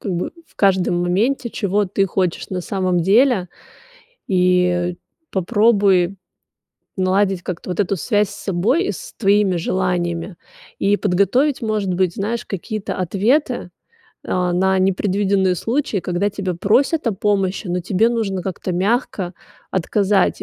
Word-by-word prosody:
как 195 - -3
бы, 175 0 -3
в - - -29
каждом 185 -3 +2
моменте, 235 +8 0
чего 205 -1 0
ты 195 +1 0
хочешь 180 -1 -1
на 185 -2 -3
самом 185 -2 0
деле. 205 +1 +3 0.8
И 180 -1 +2 0.4
попробуй 195 -2 +3 0.8
наладить 190 0 +1
как-то 180 0 -6
вот 180 - -1
эту 200 0 0
связь 205 +2 +1
с 200 - -10
собой, 210 - +1
и - - -1
с - - -9
твоими 200 -3 +3
желаниями. 175 0 -1 0.4
И 200 +1 +2
подготовить, 205 +9 +1
может 215 -4 -1
быть, 180 -1 +1
знаешь, 220 +3 -3
какие-то 210 +2 -4
ответы, 215 - 0 0.5
а, 180 -1 0
на 190 +2 +2
непредвиденные 190 0 +1
случаи, 230 - -1
когда 180 +3 -1
тебя 195 -2 -3
просят 240 - +1
о 230 - +2
помощи, 195 0 0
но 180 +1 -1
тебе 190 +5 +2
нужно 205 -6 -2
как-то 185 0 -4
мягко 190 -1 -1 0.4
отказать. 195 +2 +1
195 Hz, 135 wpm, -20 LUFS, 180-210 Hz, 0.8 s, деле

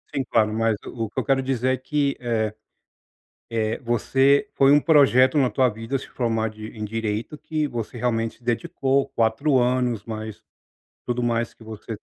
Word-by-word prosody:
Sim, 135 - 0
claro, 110 -2 +1
mas 115 -1 +1
o 115 -3 -4
que - - -4
eu - - -1
quero 135 -1 +2
dizer 130 -1 0
é - - -1
que, 140 +1 -1
eh 110 -3 -1 0.9
eh, 110 -1 -1
você 135 +4 +2
foi 135 0 +5
um 145 - +6
projeto 140 -3 +5
na 130 -3 +3
tua 130 -2 +3
vida, 115 +4 -4
se - - -10
formar 115 -3 -1
de 110 0 -9
em 110 - -6
direito, 110 +5 -3
que 155 -1 -2
você 120 -3 -5
realmente 115 -1 -1
se - - -26
dedicou 135 +2 0
4 120 +5 +2
anos, 125 -3 +1
mas 110 -1 -7 0.6
tudo 120 0 -2
mais 115 -1 0
que - - -19
você 110 0 -7
120 Hz, 180 wpm, -23 LUFS, 110-135 Hz, 0.9 s, um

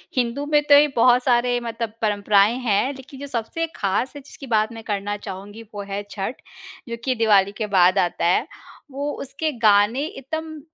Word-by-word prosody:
हिंदू 250 +3 -1
में 295 0 +3
तो 285 - +9
ये 295 +1 +6
बहुत 245 +1 +4
सारे 245 -1 +2
मतलब 230 -1 -4
परंपराएँ 205 +1 +3
हैं, 240 +3 +1
लेकिन 265 0 -12
जो 285 - -6
सबसे 270 +7 -3
ख़ास 200 +6 -1
जिसकी 275 0 -11
बात 215 +1 0
मैं 225 -1 -9
करना 205 -1 -3
चाहूँगी 205 +3 -9
वो 205 - -5
है 200 +1 -2
छठ, 205 +5 -5 0.5
जो 235 - -4
कि 255 -1 0
दिवाली 205 -3 +3
के 215 - -2
बाद 185 +2 +5
आता 175 -1 0
है। 185 - +2 0.4
वो 285 +2 -3
उसके 300 +3 -3
गाने 215 +5 +4
इतम 315 +2 -6
235 Hz, 180 wpm, -22 LUFS, 205-270 Hz, 0.5 s, तो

